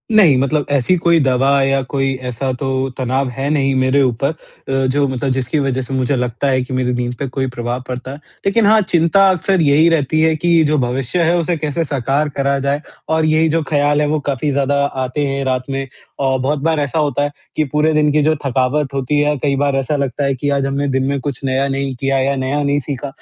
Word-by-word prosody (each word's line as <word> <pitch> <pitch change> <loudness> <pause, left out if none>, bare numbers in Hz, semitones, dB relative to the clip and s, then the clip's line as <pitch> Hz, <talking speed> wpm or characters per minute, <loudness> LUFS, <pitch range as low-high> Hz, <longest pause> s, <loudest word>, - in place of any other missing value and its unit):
नहीं 170 -11 +6
मतलब 140 +2 0
ऐसी 140 +6 +2
कोई 170 0 +3
दवा 135 +2 +2
या 135 0 +1
कोई 135 -1 0
ऐसा 130 +2 -2
तो 135 - -2 0.3
तनाव 130 +1 -1
है 135 +3 -3
नहीं 135 -3 +1
मेरे 130 +2 +2
ऊपर 130 +2 0
अ, 160 - -5 0.5
जो 140 +2 +1
मतलब 130 +1 -2
जिसकी 130 +3 -1
वज़ह 135 -2 -1
से 130 +2 -6
मुझे 130 +2 0
लगता 125 +2 -2
है 130 -1 +2
कि 130 +1 -7
मेरी 125 -1 0
नींद 125 0 -2
पे 140 - -2
कोई 130 +1 -2
प्रभाव 120 0 -4
पड़ता 130 +1 -5
है। 140 - -8 0.3
लेकिन 205 +3 +3
हाँ, 215 +1 +5
चिंता 190 +2 +3
अक्सर 185 0 +1
यही 150 +3 +4
रहती 155 -1 +1
है 160 0 +3
कि 170 0 +3
जो 150 - +1
भविष्य 130 +5 -1
है, 170 +2 +2
उसे 170 0 -1
कैसे 155 +2 -2
साकार 140 +1 -1
करा 140 0 +1
जाए 140 +2 -1 0.3
और 160 0 +2
यही 155 +1 +2
जो 165 +1 +1
ख़्याल 145 0 +2
है 150 - +1
वो 155 +1 0
काफ़ी 140 +2 -1
ज़्यादा 140 0 0 0.3
आते 145 +3 -2
हैं, 135 0 -2
रात 130 -1 0
में 135 0 -3 0.4
और 130 0 +1
बहुत 140 +3 -1
बार 160 -1 +1
ऐसा 145 +2 -1
होता 145 -1 0
है 145 - -1 0.2
कि 155 - +2
पूरे 155 +1 +2
दिन 150 -1 +3
की 150 - +2
जो 155 +1 +2
थकावट 135 +2 0
होती 135 +2 0
है, 150 0 +2
कई 140 +1 0
बार 140 0 0
ऐसा 135 +3 -1
लगता 140 0 -2
है 135 - +1
कि 145 +3 -2
आज 140 -1 0
हमने 140 +1 -1
दिन 130 - 0
में 140 0 -1
कुछ 140 0 -5
नया 135 +1 +1
नहीं 135 -1 -2
किया 135 0 0
या 135 +1 +1
नया 135 +2 -1
नहीं 145 0 +1
सीखा। 140 0 -5
140 Hz, 235 wpm, -17 LUFS, 130-150 Hz, 0.5 s, नहीं